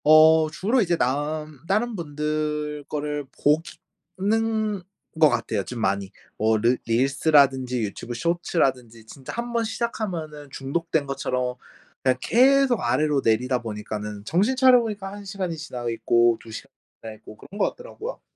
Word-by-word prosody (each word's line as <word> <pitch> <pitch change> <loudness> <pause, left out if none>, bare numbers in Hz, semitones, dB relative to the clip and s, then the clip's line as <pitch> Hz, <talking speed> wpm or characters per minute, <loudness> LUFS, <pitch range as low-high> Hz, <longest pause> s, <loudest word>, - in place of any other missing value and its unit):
어 155 +1 +7
주로 220 +10 +1
이제 175 -4 +1
남 150 +2 -2
다른 220 +4 0
분들 150 -2 -3
거를 150 -1 -3 0.2
보기 150 +3 +2 0.4
는 215 0 0 0.4
것 155 - +8
같아요, - - -1
좀 125 - -6
많이. 100 -2 0 0.3
뭐 110 +1 +2
르 120 +4 +2
릴스라든지 130 0 +3
유튜브 110 +3 -5
쇼츠라든지 130 -7 -1
진짜 130 +3 -10
1 240 +1 -4
번 230 -1 +1
시작하면은 175 -11 -4
중독된 155 +3 -2
것처럼 125 -2 -2 0.5
그냥 130 -1 +3
계속 265 0 +4
아래로 140 +3 +1
내리다 125 +3 +1
보니까는 105 -2 -6
정신 200 - +2
차려보니까 230 -7 +3
1 205 0 -9
시간이 185 -3 -3
지나 125 -6 -6
있고 120 0 +3
2 115 - -14
시간 110 - -9 0.3
지나 110 - -7
있고 105 - -13
그런 200 - -11
것 - - +1
같더라고요. - - -8
150 Hz, 305 characters per minute, -24 LUFS, 125-195 Hz, 0.5 s, 것